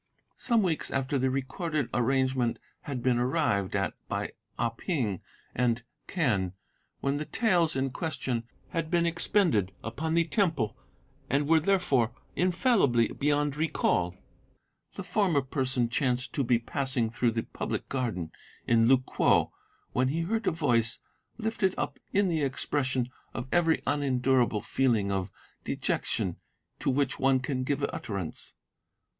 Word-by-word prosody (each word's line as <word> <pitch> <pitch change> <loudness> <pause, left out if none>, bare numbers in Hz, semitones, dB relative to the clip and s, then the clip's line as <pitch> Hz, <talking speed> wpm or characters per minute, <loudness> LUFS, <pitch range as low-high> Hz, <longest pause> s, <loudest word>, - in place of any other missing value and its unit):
"Some 230 -4 +2
weeks 165 -4 0
after 135 0 0
the 130 +1 +2
recorded 135 +2 -2
arrangement 130 -1 +1 0.3
had 130 -4 -4
been 125 -2 +3
arrived 120 - +1
at 100 -1 0
by - - -2 0.3
Ah 120 - +1
Ping 115 - -2 0.3
and 120 -1 +1 0.2
Quen, 105 - 0 0.5
when 140 +1 0
the 150 - -3
taels 175 -8 +2
in 135 0 0
question 130 -6 -2 0.2
had 165 -3 -2
been 170 0 +2
expended 165 - +2
upon 155 +8 -2
the 170 - +5
Temple 160 - 0 0.5
and 145 +1 +1
were, 160 +1 +5
therefore, 145 - +2 0.2
infallibly 180 - +3
beyond 145 0 0
recall, 90 - +1 0.8
the 200 - -5
former 180 -6 +2
person 130 -2 0
chanced 125 +1 0
to 140 - +1
be 120 -1 +3
passing 125 -1 -1
through 120 +1 +1
the 115 0 -1
public - - -4
garden 115 -11 -2 0.3
in 115 -1 +4
Lu 135 +1 +7
kwo 130 - +2 0.4
when 130 +1 +2
he 155 +5 0
heard 220 +6 -1
a - - +4
voice 120 -8 +1 0.4
lifted 220 -4 0
up - - -3
in 200 0 +3
the 165 -3 0
expression 130 -2 0 0.3
of - - -3
every 165 -2 +3
unendurable 130 -5 +2
feeling 115 -7 +1
of 95 0 -1 0.3
dejection 90 -2 -1 0.4
to - - 0
which 135 0 +1
one 135 0 +4
can 130 0 -2
give 140 +1 -1
utterance. 100 -6 -5
135 Hz, 140 wpm, -29 LUFS, 120-160 Hz, 0.8 s, Lu